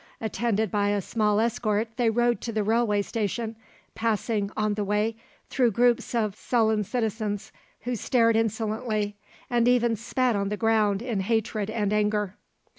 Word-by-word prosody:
Attended 220 -2 -1
by 205 -1 +1
a 205 0 +1
small 210 +1 +1
escort 225 -1 0
they 240 -2 +3
rode 240 +1 +1
to 235 - -4
the 215 -1 0
railway 215 -1 +2
station, 225 +1 -3 0.4
passing, 220 -2 -1
on 215 -1 +1
the 205 0 -2
way, 210 +2 0 0.4
through 250 -3 +3
groups 240 +2 +2
of 215 -4 0
sullen 220 -2 +1
citizens 215 -1 -2 0.3
who 245 0 -2
stared 230 +1 +2
insolently, 220 -1 -1 0.3
and 240 -1 +2
even 240 -2 +3
spat 240 +2 0
on 200 -1 -1
the 210 - -2
ground 215 -2 +2
in 235 -5 -2
hatred 215 0 -1
and 210 -2 -1
anger. 210 -2 0
220 Hz, 155 wpm, -26 LUFS, 210-235 Hz, 0.4 s, they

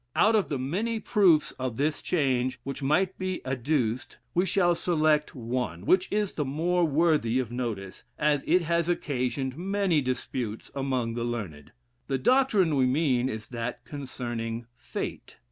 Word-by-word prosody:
Out 220 +1 +5
of 210 - +2
the 145 - -1
many 200 - -1
proofs 190 -10 +4
of 130 -3 -3
this 150 +2 0
change, 130 -6 0
which 140 +1 -5
might 175 +7 +1
be 185 -1 -2
adduced, 130 -2 -1 0.2
we 180 +2 +2
shall 175 -1 +3
select 155 -4 +1
one, 115 -7 -3
which 185 - +3
is 210 -1 0
the 150 - -1
more 170 +6 +1
worthy 150 -6 +2
of 125 -3 -1
notice, 115 -5 -4
as 150 -2 +2
it 180 +2 +4
has 170 +1 +1
occasioned 130 -5 -1
many 190 -2 +1
disputes 125 -3 -3
among 130 -4 -1
the 120 0 -2
learned. 100 -12 -5 0.4
The 135 - 0
doctrine 205 - +3
we 130 -2 +3
mean 130 -2 +2
is 110 -2 -6
that 120 0 -5
concerning 120 -4 -5
fate. - - -6
140 Hz, 155 wpm, -27 LUFS, 125-170 Hz, 0.4 s, Out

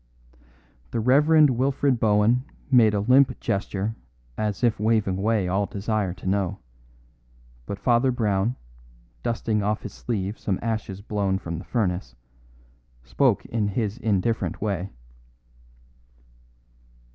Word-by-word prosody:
The - - -2
Rev. 150 +6 +5
Wilfred 130 0 +1
Bohun 110 +3 +3 0.3
made 110 -5 +5
a 100 - +1
limp 130 +5 +4
gesture 100 +2 -2 0.4
as 105 +1 -3
if 115 -4 +2
waving 105 -3 +1
away 105 -2 +1
all 95 +2 0
desire 100 -1 -2
to 90 - -14
know; 100 0 0 1.1
but 100 - -4
Father 120 +5 +2
Brown, 110 -1 0 0.7
dusting 110 - -1
off 105 +1 -1
his - - -7
sleeve 105 -3 -3
some 95 -3 -1
ashes 110 -4 -3
blown 100 -3 0
from 85 -3 -5
the 95 - -10
furnace, 90 - -2 0.9
spoke - - +1
in 110 -3 -1
his 105 +2 -2
indifferent 110 +1 0
way. 100 -3 -2
105 Hz, 120 wpm, -24 LUFS, 100-115 Hz, 1.1 s, Rev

